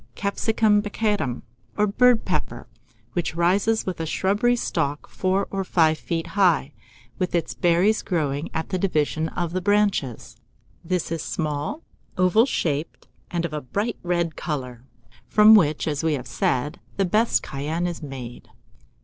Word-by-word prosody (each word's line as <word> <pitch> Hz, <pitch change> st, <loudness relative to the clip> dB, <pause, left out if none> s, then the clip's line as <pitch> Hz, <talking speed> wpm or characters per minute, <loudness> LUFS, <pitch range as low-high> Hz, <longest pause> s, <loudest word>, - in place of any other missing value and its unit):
Capsicum 210 Hz, +1 st, +2 dB
baccatum, 205 Hz, -, -1 dB, 0.3 s
or 210 Hz, -, +4 dB
bird 240 Hz, +3 st, +3 dB
pepper, -, -, -3 dB, 0.5 s
which 175 Hz, -2 st, -2 dB
rises 195 Hz, +6 st, +2 dB
with 185 Hz, -3 st, -4 dB
a 165 Hz, -, -3 dB
shrubby 205 Hz, +9 st, +2 dB
stalk 150 Hz, -10 st, -2 dB
four 190 Hz, +1 st, 0 dB
or 195 Hz, -1 st, -1 dB
five 160 Hz, -4 st, +2 dB
feet 165 Hz, -1 st, -3 dB
high, 175 Hz, -7 st, +2 dB, 0.5 s
with 180 Hz, -1 st, -1 dB
its 170 Hz, -, -1 dB
berries 180 Hz, +5 st, +2 dB
growing 150 Hz, -4 st, -2 dB
at 160 Hz, 0 st, -3 dB
the 185 Hz, -, -1 dB
division 160 Hz, -3 st, 0 dB
of 175 Hz, -1 st, -3 dB
the 185 Hz, -, -1 dB
branches: 200 Hz, -, 0 dB, 0.5 s
this 175 Hz, -1 st, -2 dB
is 165 Hz, -2 st, -2 dB
small, 155 Hz, -, -3 dB, 0.3 s
oval 185 Hz, +7 st, +4 dB
shaped, 150 Hz, -, -2 dB, 0.2 s
and 170 Hz, -1 st, -1 dB
of 160 Hz, -, -5 dB
a 150 Hz, -, -3 dB
bright 205 Hz, -, -3 dB
red 175 Hz, -2 st, -1 dB
colour, 125 Hz, -6 st, -4 dB, 0.5 s
from 215 Hz, +1 st, +7 dB
which, 155 Hz, -9 st, +4 dB
as 150 Hz, 0 st, -1 dB
we 160 Hz, -1 st, +2 dB
have 130 Hz, -3 st, -3 dB
said, 125 Hz, +4 st, -1 dB, 0.2 s
the 195 Hz, -, +2 dB
best 215 Hz, +6 st, +2 dB
cayenne 155 Hz, +5 st, -3 dB
is 175 Hz, -1 st, -4 dB
made. 130 Hz, -5 st, -8 dB
175 Hz, 150 wpm, -24 LUFS, 150-200 Hz, 0.5 s, from